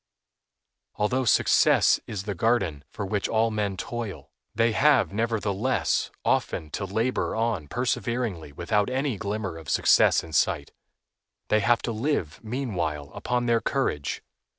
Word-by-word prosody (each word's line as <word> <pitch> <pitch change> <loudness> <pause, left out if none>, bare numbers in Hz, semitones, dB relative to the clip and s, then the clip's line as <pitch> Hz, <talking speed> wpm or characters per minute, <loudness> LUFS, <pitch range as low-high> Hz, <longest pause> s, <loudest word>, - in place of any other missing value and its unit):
Although 125 +5 0
success - - +4
is 100 -3 -4
the 100 -1 -3
guerdon 95 -8 0
for 100 - -5
which 100 +1 -1
all 115 0 +2
men 105 -3 -2
toil, 115 -2 -6 0.2
they 115 +1 +3
have, 135 -3 +3
nevertheless, 110 0 0 0.2
often 75 -1 0
to 100 - -3
labor 110 +6 -1
on 110 -9 -1
perseveringly 115 - -2
without 100 - 0
any 130 -2 -1
glimmer 100 -4 -3
of 80 - -10
success - - +4
in 80 - -11
sight. 80 -4 +1 0.8
They 110 - +4
have 115 +1 +2
to 120 - -2
live, 110 - -2
meanwhile, 90 - -3
upon 125 0 -1
their 115 -1 +2
courage. 105 - -1
110 Hz, 135 wpm, -26 LUFS, 95-120 Hz, 0.8 s, success